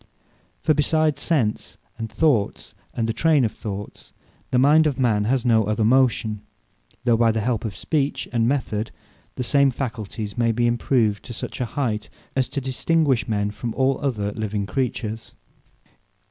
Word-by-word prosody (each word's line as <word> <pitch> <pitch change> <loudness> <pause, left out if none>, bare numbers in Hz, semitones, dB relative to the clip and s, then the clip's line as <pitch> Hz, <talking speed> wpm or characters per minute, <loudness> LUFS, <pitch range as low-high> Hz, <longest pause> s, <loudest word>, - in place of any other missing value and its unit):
For 155 - +4
besides 150 -1 +1
Sense, 130 -11 0 0.2
and 110 -1 -4
Thoughts, 135 -11 +1 0.2
and 115 -1 -2
the 115 - 0
Trayne 150 0 +3
of 110 - -1
thoughts, 100 -1 -8 0.4
the 125 - +1
mind 150 +5 +5
of 140 -4 -1
man 110 -5 +2
has 130 +2 +1
no 110 -3 +4
other 110 +1 0
motion; 115 -3 +2 0.6
though 120 -2 +4
by 115 -1 +4
the 110 - -1
help 115 -1 -1
of 105 -4 -4
Speech, 145 - -1
and 115 -1 +2
Method, 120 -5 -1 0.5
the 125 - -2
same 140 +2 +4
Facultyes 110 -4 -5
may 115 -1 +3
be 120 +1 +1
improved 120 -3 +1
to 120 - -7
such 120 - -5
a - - +1
height, 115 -4 -2 0.3
as 130 -1 +1
to - - -2
distinguish 135 +1 +1
men 105 -2 0
from 115 +2 -5
all 135 0 +2
other 110 -8 -1
living 105 -1 -3
Creatures. 115 -2 -3
120 Hz, 165 wpm, -23 LUFS, 110-135 Hz, 0.6 s, mind